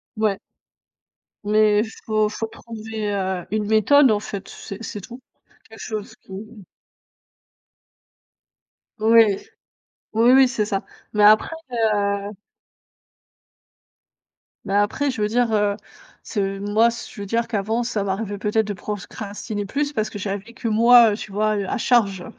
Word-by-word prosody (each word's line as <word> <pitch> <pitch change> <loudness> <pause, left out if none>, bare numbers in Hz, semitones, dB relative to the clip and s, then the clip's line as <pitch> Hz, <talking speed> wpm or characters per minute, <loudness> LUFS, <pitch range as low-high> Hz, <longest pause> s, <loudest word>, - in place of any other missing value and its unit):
Ouais. 215 -3 0 1.0
Mais 210 0 +3 0.2
faut 215 -1 +1
faut 225 +1 -4
trouver, 220 -2 -6
heu, 190 -2 -2
une 215 0 -1
méthode, 230 +5 +5
en 210 - +2
fait, 200 -2 -7
c'est 200 +2 -9
c'est 210 -2 -6
tout. 240 +6 -11 0.5
Quelque 225 0 -14
chose 215 -2 -6
qui - - -17 2.7
Ouais. 220 -2 +5 0.8
Oui, 230 +3 +5
oui, 265 0 +6
c'est 245 -4 -1
ça, 195 -2 -3 0.3
mais 210 - +1
après, 215 +9 +5 0.2
heu 205 -3 0 2.4
mais 195 - -3
après, 205 +8 +1
je 240 -4 -5
veux 210 - +2
dire, 235 +1 +1
heu, 205 -1 +2 0.5
ce 195 -3 -2
moi 210 +3 +3
ce 235 - -8
je 205 - -9
veux - - -4
dire 230 +3 -1
qu'avant, 220 +1 -1
ça 220 -4 -2
m'arrivait 200 +1 -3
peut-être 210 +1 0
de 205 - -2
procrastiner 205 +2 -6
plus, 285 +7 -2
parce 215 -5 -1
que 205 - -8
j'avais 200 +3 -5
que 235 - -5
moi, 230 +1 +6
heu, - - -4
tu 215 - -8
vois? 215 +2 +1
Heu, 200 - -2
à - - -1
charge. 205 -7 +1
215 Hz, 145 wpm, -22 LUFS, 205-230 Hz, 2.7 s, oui